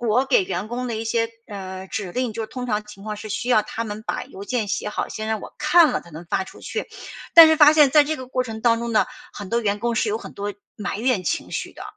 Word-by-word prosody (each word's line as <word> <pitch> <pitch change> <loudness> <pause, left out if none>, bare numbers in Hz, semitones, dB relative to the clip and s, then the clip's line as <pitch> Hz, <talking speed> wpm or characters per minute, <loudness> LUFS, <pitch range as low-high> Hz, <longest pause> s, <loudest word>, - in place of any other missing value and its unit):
我 240 +2 +2
给 265 -6 +4
员 185 +2 -3
工 245 +1 -3
的 235 - -2
一 220 - -4
些， 230 0 0 0.2
呃， 190 -2 -7
指 195 -1 -4
令， 250 -2 -1
就 225 +1 -4
通 250 +2 -6
常 210 -2 -1
情 210 -2 -13
况 215 -1 -4
是 215 +1 -8
需 235 - -3
要 220 -4 +5
他 230 - -5
们 210 0 -6
把 - - -2
邮 195 - -10
件 230 0 -1
写 210 - -2
好， 210 - -3
先 215 - -5
让 220 -2 -1
我 - - -10
看 305 +2 +5
了 - - -1
才 170 - -16
能 165 +2 -10
发 - - 0
出 - - -14
去。 - - -4 0.5
但 330 -1 +12
是 315 - +4
发 300 -1 +8
现 295 -3 +6
在 300 +1 +7
这 310 +2 -2
个 255 - -8
过 255 0 -1
程 225 -3 -7
当 230 0 +3
中 235 0 -3
呢， 215 - +3 0.3
很 205 - -8
多 235 +4 +1
员 205 -2 0
工 235 +1 -1
是 225 - +1
有 215 +2 -1
很 - - -10
多 205 +1 -4 0.2
埋 205 -1 -4
怨 240 -4 +1
情 - - -2
绪 - - -4
的， - - -11
225 Hz, 300 characters per minute, -23 LUFS, 205-250 Hz, 0.5 s, 但